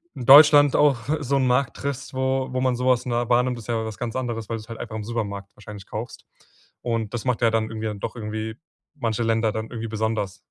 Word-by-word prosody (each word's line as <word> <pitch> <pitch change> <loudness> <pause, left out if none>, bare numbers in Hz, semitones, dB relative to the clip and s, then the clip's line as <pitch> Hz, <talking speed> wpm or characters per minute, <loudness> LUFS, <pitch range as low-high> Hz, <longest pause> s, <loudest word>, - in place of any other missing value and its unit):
in 125 - -6
Deutschland 145 +1 +8
auch 145 -4 +4 0.2
so 140 -1 0
'nen 130 - +2
Markt 125 +1 +1
triffst, 140 -1 -5
wo 130 0 0
wo 130 0 -1
man 130 -1 +1
so 125 +1 -3
was 125 -1 +3
nahe 120 -1 -1
wahrnimmt, 125 +1 +2
das 115 - -9
ist - - -15
ja 115 -1 -1
was 110 -2 -6
ganz 120 -2 -4
anderes, 120 -4 -3
weil 115 - -2
du's 110 0 -12
halt 115 - -8
einfach 110 -2 -6
im 110 - -4
Supermarkt 100 -3 -4
wahrscheinlich 105 -2 -11
kaufst. 115 +3 -7 0.6
Und 115 -3 -2
das 120 -1 -4
macht 125 -2 0
ja 115 - +4
dann 110 -1 +1
irgendwie 110 0 -4
dann 105 -2 -5
doch - - -5
irgendwie 110 -1 -5 0.4
manche 115 -3 -2
Länder 115 -1 +1
dann 110 +1 -5
irgendwie 115 -1 -5
besonders. 110 -3 -2
115 Hz, 240 wpm, -24 LUFS, 110-125 Hz, 0.6 s, Deutschland